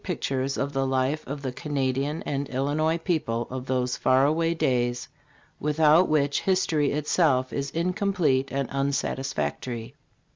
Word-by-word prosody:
pictures 135 -6 -2
of 140 +1 -2
the 135 0 0
life 130 +4 0
of 140 +1 -5
the 130 - -2
Canadian 140 +2 -2
and 140 0 -3
Illinois 150 +5 0
people 150 -9 -1
of 130 0 -5
those 125 -1 0
far 130 +1 +3
away 165 +3 +2
days, 120 -5 0 0.5
without 155 +3 +4
which 145 -2 +2
history 165 -6 +1
itself 150 -3 +1
is 140 0 -2
in 170 +3 -1
complete 180 -10 +1
and 135 -1 -1
unsatisfactory. 125 - -2
140 Hz, 140 wpm, -26 LUFS, 130-155 Hz, 0.5 s, without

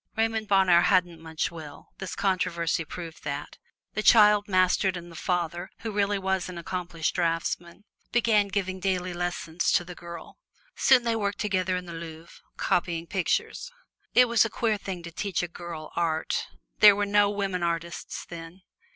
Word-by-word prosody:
Raymond 220 -1 0
Bonheur 190 -3 +5
hadn't 175 -3 +2
much 160 0 -3
will 155 -4 -10
this 190 - -5
controversy 180 -4 0
proved 165 +1 -9
that 145 0 -5 0.3
the 215 - -1
child 210 -2 +6
mastered, 185 0 +2
and 175 0 -9
the - - -12
father, 175 0 -2
who 225 - -4
really 205 0 +1
was 190 -1 -1
an 180 - -7
accomplished 170 -1 -3
draftsman, 170 +2 -2 0.3
began 220 -4 +3
giving 190 -1 -2
daily 185 -1 -1
lessons 175 -1 -1
to - - +3
the 180 - -8
girl. 170 - -10 0.4
Soon 260 -2 +5
they 230 -1 +1
worked 205 -2 -1
together 185 -3 0
in 180 - -6
the 170 - -8
Louvre, 165 0 -10 0.2
copying 170 -1 0
pictures. 190 - -1 0.4
It 250 - +8
was 235 -2 +4
a 225 - -1
queer 220 -1 0
thing 185 -3 -6
to 170 - -8
teach 190 +1 -2
a - - -2
girl 170 -2 -8
art 160 -2 -1 0.3
there 205 -1 +9
were 205 0 0
no 205 0 +4
women 195 -3 -2
artists 170 0 -3
then. 170 +2 -10
180 Hz, 170 wpm, -27 LUFS, 170-200 Hz, 0.4 s, there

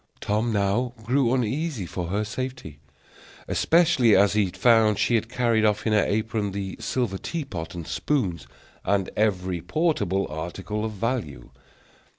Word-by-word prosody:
Tom 110 +3 0
now 110 +5 0
grew 125 +1 +2
uneasy 130 - -1
for 85 0 -4
her 100 +4 -1
safety, 125 - -6 0.7
especially 160 -10 +4
as 100 +1 +4
he 105 -2 +2
found 110 +1 +3
she - - +1
had 115 0 +1
carried 120 -3 +1
off 105 0 +1
in 110 - +2
her 105 - +4
apron 105 -1 -1
the 95 -1 -4
silver 115 -7 -2
tea 165 -4 -4
pot 90 -9 -6
and 85 -2 -6
spoons, 95 - -1 0.4
and 100 -2 0
every 95 -5 0
portable 100 - 0
article 95 +7 -5
of 110 -1 -3
value. 105 - -3
105 Hz, 150 wpm, -25 LUFS, 95-125 Hz, 0.7 s, especially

